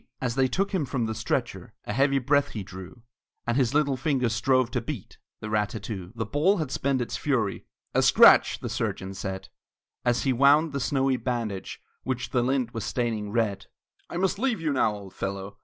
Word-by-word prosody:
As 125 -2 -1
they 130 +1 +2
took 195 +10 -1
him 185 -6 0
from 130 -3 -2
the 110 - -2
stretcher 110 +1 -3
A 105 - -3
heavy 140 +3 +3
breath 140 +2 +2
he 105 - -4
drew, 95 +6 -11 0.4
And 120 - 0
his 130 0 +1
little 145 -2 +3
fingers 130 -3 0
strove 130 +3 +2
to 125 - -1
beat 120 -3 -7 0.2
The 110 - -5
rat 105 -1 +1
tat 110 -3 -7
too! 95 -5 -6
The 115 -1 -2
ball 155 - +2
had 155 -6 -3
spent 135 -2 0
its 120 - -3
fury: 120 -9 -1 0.3
"A - - +3
scratch!" - - +6
the - - -4
surgeon 95 +1 -3
said, 95 -1 -5 0.5
As 120 -1 +1
he 135 - +2
wound 145 +5 +5
the 140 - -2
snowy 135 -1 +1
bandage 115 -5 -4 0.2
Which 125 -1 -3
the 125 - +2
lint 125 -1 0
was 115 -3 -4
staining 110 -1 -2
red. 110 -3 -1 0.4
"I - - -5
must 190 +2 0
leave 250 -2 0
you 155 -3 0
now, 110 -5 +2
old 100 -2 -10
fellow!" 100 0 -5
125 Hz, 205 wpm, -26 LUFS, 110-140 Hz, 0.5 s, scratch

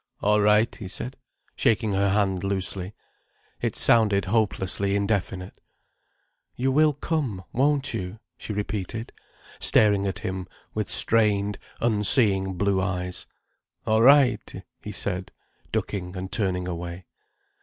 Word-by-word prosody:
"All 105 +1 +3
right," 105 +3 +3
he 100 - -8
said, 125 +6 -4 0.4
shaking 110 -1 +1
her 100 0 +1
hand 95 -2 0
loosely. 95 0 -2 0.7
It - - -2
sounded 105 -4 +4
hopelessly 100 -2 0
indefinite. 100 -2 -2 0.9
"You 130 +2 0
will 150 +2 +4
come, 135 - -3
won't 135 0 +1
you?" 95 -1 -5 0.2
she - - -7
repeated, 105 +2 -4 0.5
staring 100 -2 +4
at 95 - -3
him 95 -1 -5 0.3
with 110 -2 -3
strained, 105 -3 +2 0.2
unseeing 105 -4 +4
blue 100 0 +1
eyes. 90 -2 -3 0.6
"All 110 0 +2
right," 125 -7 +4 0.2
he 105 - -7
said, 95 -2 -3 0.4
ducking 90 -2 -3
and 95 +1 -6
turning 90 -3 0
away. 85 +1 -6
100 Hz, 120 wpm, -25 LUFS, 95-110 Hz, 0.9 s, sounded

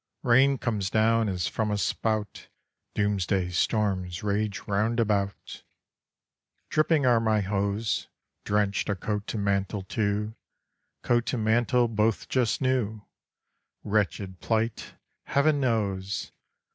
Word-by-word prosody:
Rain 135 +2 +5
comes 105 -6 -1
down 110 0 +2
as 90 -3 -1
from 110 -1 -1
a 105 - 0
spout, 110 0 -2 0.5
Doomsday 100 -3 0
storms 95 -2 0
rage 105 -1 -1
round 110 +4 0
about, 100 -3 -1 1.1
Dripping 155 -2 +3
are 120 -2 +5
my 110 -2 +2
hose; 100 +2 -1 0.4
Drenched 100 -1 0
are 100 - +1
coat 105 +2 -3
and 100 -2 -2
mantle 100 0 0
too, 105 +1 -1 0.7
Coat 120 -1 +1
and 115 -4 -1
mantle, 120 +2 +3
both 110 -1 0
just 125 -2 +1
new, 115 -5 0 0.8
Wretched 100 -2 -1
plight, 115 0 -2 0.3
heaven 145 +1 +2
knows! 100 -6 -1
105 Hz, 115 wpm, -27 LUFS, 100-115 Hz, 1.1 s, Rain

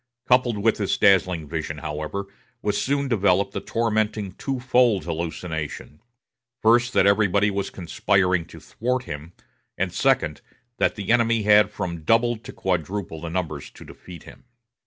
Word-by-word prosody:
Coupled 125 -3 +3
with 110 +2 +2
this 100 -3 0
dazzling 90 -5 +3
vision, 75 -1 -4
however, 75 +6 -4 0.4
was 105 - 0
soon 140 +1 0
developed 100 -4 +2
the - - -3
tormenting 110 -3 -1
twofold 125 -2 +1
hallucination: 80 -2 -5 0.6
first, 120 +3 +3
that - - +4
everybody 100 0 +3
was 100 0 -2
conspiring 90 0 +1
to - - -12
thwart 125 +2 -2
him; 75 -3 -8 0.4
and, - - -1
second, 75 -1 +1 0.4
that - - +1
the 100 0 -3
enemy 115 -2 +3
had 105 -1 +5
from 85 -5 -5
double 115 +8 +2
to 110 - -11
quadruple 85 -2 -3
numbers 80 -4 -4
to - - -14
defeat 85 -4 -12
him. 130 - -15
100 Hz, 140 wpm, -24 LUFS, 85-115 Hz, 0.6 s, had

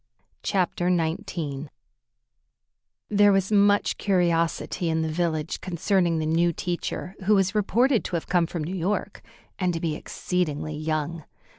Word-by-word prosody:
CHAPTER 180 -2 0
XIX 165 -4 -2 1.4
There 205 0 +5
was 195 +1 +1
much 205 0 +3
curiosity 170 -2 +1
in 160 0 +1
the 160 - -2
village 160 -1 -1
concerning 175 -1 +1
the 155 - -1
new 165 +2 +2
teacher, 175 +2 -4
who 210 +2 +5
was 195 0 +2
reported 230 +4 +2
to 175 - -3
have 165 - -2
come 175 -2 +2
from 165 -1 -4
New 170 +5 -4
York, 195 +3 -2 0.4
and 180 -2 +1
to - - -2
be 165 -2 -1
exceedingly 155 -2 -2
young. 155 +1 -2
175 Hz, 140 wpm, -25 LUFS, 160-195 Hz, 1.4 s, There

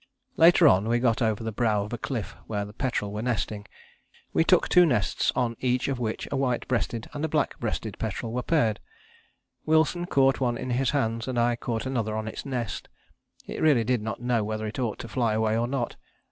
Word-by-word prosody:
Later 170 0 +7
on 105 -5 +4
we 120 - +3
got 120 -1 +1
over 110 -1 0
the 110 - -3
brow 110 -2 +1
of 105 - -7
a - - -2
cliff 120 -7 -4
where 105 -2 -2
the 105 - -11
petrel 110 -5 -2
were 105 - -3
nesting. 110 -3 -2 0.7
We - - +4
took 180 +1 +4
two 180 - +6
nests, 120 - +1
on 120 -3 0
each 125 -1 0
of 135 -3 -2
which 110 -2 -3
a - - -1
white 130 -3 0
breasted 120 -2 -1
and 145 +1 -4
a - - +2
black 150 -1 -1
breasted 110 -2 -4
petrel 110 +1 -3
were 125 - -1
paired. 120 -9 +1 0.8
Wilson 160 +3 +2
caught 135 -3 +3
one 120 -3 0
in 130 - -4
his 125 +1 +1
hands 115 -4 -1
and 130 -2 -2
I 120 0 +3
caught 115 0 -3
another 115 -5 -1
on 110 0 -3
its 110 - -6
nest; 120 -8 -4 0.6
it - - -6
really 145 -7 +4
did 125 0 0
not 110 -2 -4
know 120 -2 0
whether 110 +1 -3
it 110 +4 -5
ought 115 -5 -1
to - - -7
fly 115 -2 0
away 110 0 +1
or 115 +1 +1
not. 125 -2 -3
120 Hz, 215 wpm, -26 LUFS, 110-130 Hz, 0.8 s, Later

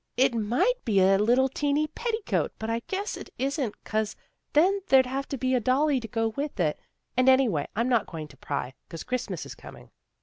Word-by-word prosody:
" - - -45
It - - -9
might 245 - +1
be 210 -5 +2
a 195 +1 +5
little 245 +5 +4
teenty 290 +2 0
petticoat, 460 -2 -1
but 220 +1 -3
I 230 - 0
guess 395 +2 -2
it - - -9
isn't 270 -3 -2
'cause 215 -1 -1 0.4
then 370 +7 +4
there'd 265 -1 +6
have 270 +2 -3
to 275 - -4
be 255 +1 0
a 255 - +4
dolly 265 +4 +2
to 230 - -7
go 225 +1 0
with 280 +1 -5
it. 155 -4 +1 0.4
And, 255 +1 +4
anyway, 250 - +3
I'm 230 +3 +1
not 240 -5 +2
going 160 -3 -6
to 140 - -16
pry, 135 -2 -4 0.2
'cause 165 - -7
Christmas 255 -1 -3
is - - -8
coming." - - -13
255 Hz, 210 wpm, -27 LUFS, 215-280 Hz, 0.4 s, there'd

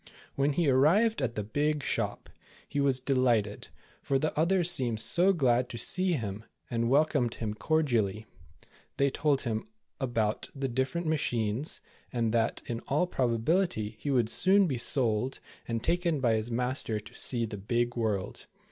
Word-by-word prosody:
When 140 +1 +1
he 165 +1 +1
arrived 170 - +3
at 115 -2 -1
the 105 - -2
big 145 +7 -1
shop, - - -2 0.4
he 145 - -3
was 135 -2 +2
delighted, 125 -6 +1 0.3
for 135 - +1
the 155 +3 -1
others 175 +2 +2
seemed 120 -8 0
so 175 - +4
glad 125 -7 +2
to 120 - -6
see 185 +10 +1
him, 110 -7 -4 0.3
and 115 0 0
welcomed 140 -4 +2
him 110 -2 -3
cordially. 110 -6 0 0.7
They 140 0 +2
told 145 -1 +1
him 110 - -3 0.3
about 115 -5 -1
the 135 -1 -2
different 130 +7 -2
machines, 125 -4 0 0.3
and 115 -2 0
that, 115 -1 0
in 115 -1 -4
all 150 +6 +2
probability 120 - 0
he 145 - -4
would 120 -5 +2
soon 195 - +4
be 135 -8 -2
sold, 120 -1 +1 0.3
and 115 -1 -2
taken 170 -3 +1
by 120 -4 +2
his 110 +1 -1
master 125 -2 -1
to 105 - -14
see 120 -3 +1
the 105 -2 -6
big 120 +4 -1
world. 110 -5 -2
125 Hz, 160 wpm, -29 LUFS, 115-150 Hz, 0.7 s, so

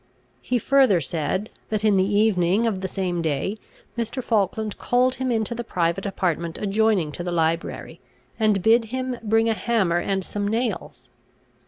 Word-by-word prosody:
He 250 - 0
further 260 -5 +4
said, 165 +7 -2 0.2
that 215 0 -1
in 210 -2 +4
the 190 - +4
evening 205 0 +3
of 205 -5 -1
the 190 - -2
same 180 -2 -2
day 165 +7 -2 0.4
Mr. 235 +2 -3
Falkland 215 -1 -1
called 250 +1 +2
him 260 -1 0
into 225 0 0
the 240 0 -4
private 180 -1 -1
apartment 170 -4 -2
adjoining 205 -5 +1
to 175 - -6
the 175 - -3
library, 165 0 -2 0.4
and 210 -4 +2
bid 230 +2 +4
him 255 +1 -4
bring 225 +1 +2
a 225 - +3
hammer 210 -7 +1
and 190 +1 -1
some 205 -1 -3
nails. 230 +4 -3
210 Hz, 165 wpm, -23 LUFS, 180-230 Hz, 0.4 s, further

